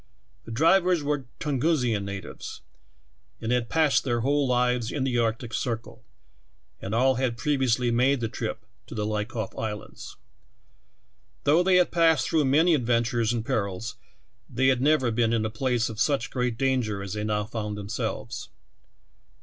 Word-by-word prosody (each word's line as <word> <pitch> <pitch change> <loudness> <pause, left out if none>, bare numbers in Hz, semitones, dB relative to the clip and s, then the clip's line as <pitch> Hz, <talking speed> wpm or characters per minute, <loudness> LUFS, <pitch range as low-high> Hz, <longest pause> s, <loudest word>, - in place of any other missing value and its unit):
The - - -8
drivers 170 +6 +3
were 145 -2 -1
Tungusian 130 -7 +1
natives, 100 -1 -7 0.8
and 115 - -3
had 125 -1 0
passed 155 -3 +3
their 120 -3 0
whole 140 +2 +2
lives 125 -1 +1
in 145 - -2
the 125 -2 0
Arctic 115 +1 -1
Circle, 115 -3 -4 0.8
and 100 +3 -3
all 130 +1 +3
had 120 -3 0
previously 125 -2 +1
made 130 +3 +3
the 115 - -1
trip - - -5 0.2
to - - -8
the 105 -1 -1
Liakhov 105 0 -3
Islands. 105 -2 -6 1.3
Though 155 +5 +4
they 185 0 +3
had 180 -1 +4
passed 165 -4 +3
through 155 -3 +2
many 160 +6 +4
adventures 120 -3 +1
and 115 -2 -2
perils, 100 +1 -2 0.6
they 130 +2 +2
had 130 -2 +2
never 140 -4 +3
been 115 0 +1
in 110 -1 +1
a 110 - -2
place 120 0 0
of 110 -2 -7
such 140 0 +1
great 125 -3 -1
danger 125 -7 0
as 100 -1 -5
they 105 0 -3
now 105 -1 0
found 105 -1 -4
themselves. 100 0 -4
120 Hz, 160 wpm, -26 LUFS, 110-140 Hz, 1.3 s, Though